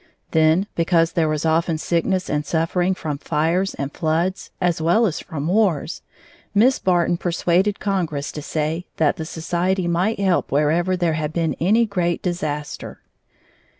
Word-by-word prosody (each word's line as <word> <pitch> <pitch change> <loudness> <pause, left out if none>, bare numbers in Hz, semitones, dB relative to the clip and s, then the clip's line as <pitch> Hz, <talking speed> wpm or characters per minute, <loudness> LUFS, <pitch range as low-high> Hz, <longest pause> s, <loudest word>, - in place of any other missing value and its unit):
Then, 160 +4 +3
because 165 -1 +2
there 165 -2 +1
was 155 +1 -1
often 165 0 +1
sickness 180 +3 0
and 150 0 -1
suffering 175 +4 0
from 150 -5 -4
fires 165 +6 0
and 140 +1 -4
floods, 165 +4 -1
as 175 -3 0
well 175 +9 +3
as 175 -7 -1
from 150 -1 -5
wars, 180 -5 +1 0.5
Miss 250 +6 +4
Barton 175 -1 +2
persuaded 175 +3 +1
Congress 170 -8 -2
to 150 - -6
say 155 +3 -2
that 155 -3 +2
the 160 - -4
society 175 +3 -1
might 180 +6 0
help 190 -3 +1
wherever 165 +6 +2
there 170 -2 +1
had 155 -1 -2
been 165 -2 0
any 215 +7 +3
great 180 -5 -1
disaster. 155 -5 -4
170 Hz, 150 wpm, -21 LUFS, 155-185 Hz, 0.5 s, Miss